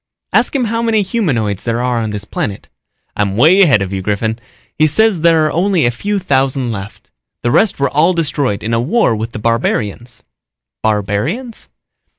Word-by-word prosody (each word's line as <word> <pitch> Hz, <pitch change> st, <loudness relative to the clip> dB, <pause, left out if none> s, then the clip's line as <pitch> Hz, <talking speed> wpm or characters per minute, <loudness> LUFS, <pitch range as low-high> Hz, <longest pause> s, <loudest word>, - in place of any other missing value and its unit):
"Ask -, -, +2 dB
him 265 Hz, -, +1 dB
how 230 Hz, 0 st, -1 dB
many 225 Hz, -3 st, +1 dB
humanoids 130 Hz, -, -1 dB
there 115 Hz, 0 st, -1 dB
are 125 Hz, -1 st, 0 dB
on 110 Hz, -1 st, -2 dB
this 105 Hz, -1 st, -5 dB
planet." 100 Hz, -1 st, -4 dB, 0.5 s
"I'm 100 Hz, -1 st, -1 dB
way 165 Hz, -, +5 dB
ahead 135 Hz, -, +4 dB
of 95 Hz, 0 st, -6 dB
you, 95 Hz, -, -2 dB
Griffin. 110 Hz, +3 st, -2 dB, 0.4 s
He 155 Hz, -, +3 dB
says 205 Hz, +2 st, +2 dB
there 165 Hz, -2 st, +4 dB
are 155 Hz, -, 0 dB
only 180 Hz, -1 st, +1 dB
a 120 Hz, -, +2 dB
few 205 Hz, -, -2 dB
thousand 135 Hz, -7 st, 0 dB
left. 100 Hz, -1 st, -8 dB, 0.3 s
The 120 Hz, -, +1 dB
rest 210 Hz, -, +2 dB
were 140 Hz, -, +2 dB
all 165 Hz, +5 st, +3 dB
destroyed 145 Hz, -, -1 dB
in 115 Hz, +2 st, -2 dB
a 115 Hz, -, +2 dB
war 150 Hz, -, +2 dB
with 110 Hz, +2 st, -4 dB
the -, -, -7 dB
barbarians." 115 Hz, +1 st, -2 dB, 0.6 s
"Barbarians?" 110 Hz, -, -2 dB
125 Hz, 180 wpm, -15 LUFS, 110-180 Hz, 0.6 s, way